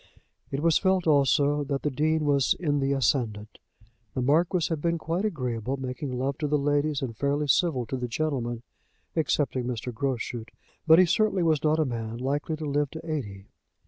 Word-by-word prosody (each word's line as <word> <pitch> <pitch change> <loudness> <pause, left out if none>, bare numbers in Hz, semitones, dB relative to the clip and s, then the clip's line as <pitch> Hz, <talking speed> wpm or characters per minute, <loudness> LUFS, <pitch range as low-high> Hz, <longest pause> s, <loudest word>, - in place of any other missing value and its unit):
It 140 - -3
was 165 -1 +4
felt 190 -2 +2
also 145 -1 +3
that 140 -1 -2
the 150 - 0
Dean 155 +3 +1
was 140 -2 +3
in 145 -4 0
the 135 0 0
ascendant. 115 -6 -1 0.6
The 130 - 0
Marquis 165 +5 +2
had 160 -3 -2
been 170 +1 +1
quite 170 +5 -2
agreeable, 130 - -2
making 130 +1 -5
love 135 +2 -2
to 150 - -1
the 150 +1 +2
ladies, 145 0 0
and 115 -4 -4
fairly 145 +3 0
civil 140 -3 +2
to 130 - -4
the 125 -1 -3
gentlemen, 120 -3 -2 0.5
excepting 145 -5 0
Mr. 125 0 -4
Groschut; 120 -2 -3 0.4
but 160 0 +8
he 185 - +7
certainly 200 0 +2
was 155 -3 +2
not 155 0 +3
a 155 - +2
man 115 -3 -4
likely 145 +5 -2
to 155 0 -6
live 145 0 0
to 160 +3 -9
eighty. 105 -11 -4
145 Hz, 185 wpm, -27 LUFS, 125-155 Hz, 0.6 s, but